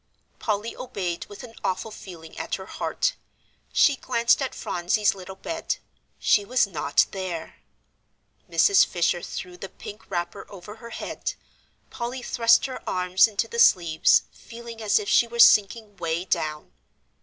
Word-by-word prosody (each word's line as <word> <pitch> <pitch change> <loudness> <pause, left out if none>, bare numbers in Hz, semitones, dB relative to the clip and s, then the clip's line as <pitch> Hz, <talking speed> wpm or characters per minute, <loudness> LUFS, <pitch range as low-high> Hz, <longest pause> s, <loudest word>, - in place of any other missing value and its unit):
Polly 215 +1 -2
obeyed 185 -9 -4
with 205 - -11
an 235 -2 -11
awful 200 +4 -2
feeling 170 -6 -11
at - - -3
her 190 - -8
heart. - - -1 0.6
She 285 - +4
glanced 235 -1 +1
at 265 - -3
Phronsie's 180 +4 0
little 190 0 -10
bed; 325 +11 -3 0.4
she 205 - +3
was 245 +3 +2
not 150 -7 +1
there! 185 -4 -5 0.9
Mrs. 400 -1 +5
Fisher 175 0 0
threw 180 +1 -7
the 190 +2 -8
pink 210 +2 -11
wrapper 175 +3 -4
over 200 +2 -11
her 235 +1 -11
head; - - -5 0.6
Polly 245 +1 -5
thrust 230 -1 +4
her 260 -1 -6
arms 180 +2 +3
into 220 +1 -2
the 235 +1 -5
sleeves, 170 -7 +5
feeling 235 -1 -11
as 215 -2 +3
if 210 - -2
she 235 - +4
were 235 0 -8
sinking 210 -1 +5
way 170 0 -2
down. 155 -4 -2
205 Hz, 150 wpm, -25 LUFS, 180-235 Hz, 0.9 s, Mrs